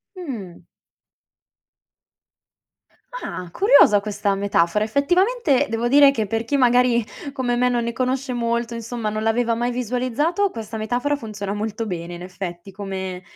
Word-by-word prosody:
Mh. 235 Hz, -, -7 dB, 2.5 s
Ah, 185 Hz, -, -6 dB
curiosa 380 Hz, -, +6 dB
questa 205 Hz, 0 st, -1 dB
metafora. 200 Hz, 0 st, +1 dB
Effettivamente 355 Hz, -, +2 dB
devo 230 Hz, +1 st, -1 dB
dire 280 Hz, +1 st, +7 dB
che 220 Hz, -6 st, -2 dB
per 225 Hz, +3 st, -1 dB
chi 285 Hz, -, -1 dB
magari 245 Hz, -2 st, +4 dB, 0.3 s
come 250 Hz, -3 st, -1 dB
me 250 Hz, +1 st, +3 dB
non 240 Hz, -1 st, +1 dB
ne 235 Hz, -, -2 dB
conosce 255 Hz, +2 st, -2 dB
molto, 235 Hz, 0 st, -1 dB
insomma, 230 Hz, -1 st, -4 dB
non 215 Hz, +1 st, -3 dB
l'aveva 230 Hz, +1 st, +1 dB
mai 240 Hz, +1 st, -1 dB
visualizzato, 255 Hz, -, 0 dB
questa 225 Hz, -, -7 dB
metafora 245 Hz, +7 st, -1 dB
funziona 205 Hz, -5 st, -5 dB
molto 215 Hz, +2 st, -3 dB
bene 175 Hz, -3 st, -5 dB
in 175 Hz, -, -10 dB
effetti. 185 Hz, 0 st, -7 dB
Come 190 Hz, -2 st, -5 dB
230 Hz, 140 wpm, -22 LUFS, 205-255 Hz, 2.5 s, dire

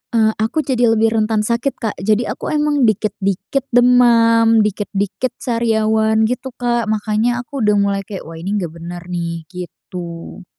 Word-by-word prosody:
eee, 220 Hz, -1 st, +4 dB
aku 225 Hz, +9 st, 0 dB
jadi 255 Hz, -4 st, +1 dB
lebih 225 Hz, 0 st, +2 dB
rentan 215 Hz, 0 st, +1 dB
sakit, 235 Hz, +5 st, -1 dB
Kak. 220 Hz, -3 st, -2 dB
Jadi 215 Hz, +4 st, +1 dB
aku -, -, -4 dB
emang 295 Hz, -3 st, +2 dB
dikit-dikit 210 Hz, +3 st, -1 dB
demam, 230 Hz, -2 st, +5 dB
dikit-dikit 205 Hz, +3 st, -2 dB
sariawan 220 Hz, -2 st, +1 dB
gitu, 255 Hz, +1 st, -4 dB
Kak. 240 Hz, -1 st, 0 dB
Makanya 220 Hz, +3 st, 0 dB
aku 275 Hz, +3 st, -7 dB
udah 210 Hz, 0 st, +3 dB
mulai 200 Hz, -1 st, +1 dB
kayak, 195 Hz, -3 st, -6 dB
"Wah 165 Hz, 0 st, -10 dB
ini 180 Hz, +4 st, -5 dB
nggak 170 Hz, -, -4 dB
bener 170 Hz, +1 st, -8 dB
nih," 170 Hz, -1 st, -3 dB
gitu. 175 Hz, 0 st, -8 dB
220 Hz, 155 wpm, -18 LUFS, 195-240 Hz, -, demam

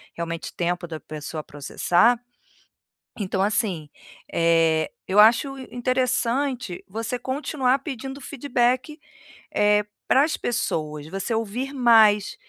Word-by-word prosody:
realmente, 170 Hz, -1 st, -5 dB
tempo 175 Hz, 0 st, -2 dB
da 160 Hz, -2 st, -6 dB
pessoa 155 Hz, 0 st, -7 dB
processar. 175 Hz, -, +2 dB, 1.0 s
Então 190 Hz, -1 st, -1 dB
assim, 195 Hz, -7 st, -1 dB, 0.4 s
eh, 165 Hz, -1 st, +3 dB, 0.2 s
eu 195 Hz, -, +1 dB
acho 240 Hz, +5 st, +4 dB
in 260 Hz, -, -8 dB
interessante 255 Hz, -3 st, -1 dB
você 225 Hz, +5 st, -3 dB
continuar 265 Hz, +1 st, 0 dB
pedindo 270 Hz, 0 st, -6 dB
feedback, 255 Hz, +1 st, -1 dB, 0.6 s
eh, 210 Hz, 0 st, +3 dB, 0.2 s
para 270 Hz, -, +5 dB
as 310 Hz, -, 0 dB
pessoas. 155 Hz, -10 st, -2 dB
Você 195 Hz, +7 st, -3 dB
ouvir 230 Hz, +5 st, -3 dB
mais, 220 Hz, -5 st, +5 dB
225 Hz, 110 wpm, -24 LUFS, 175-255 Hz, 1.0 s, para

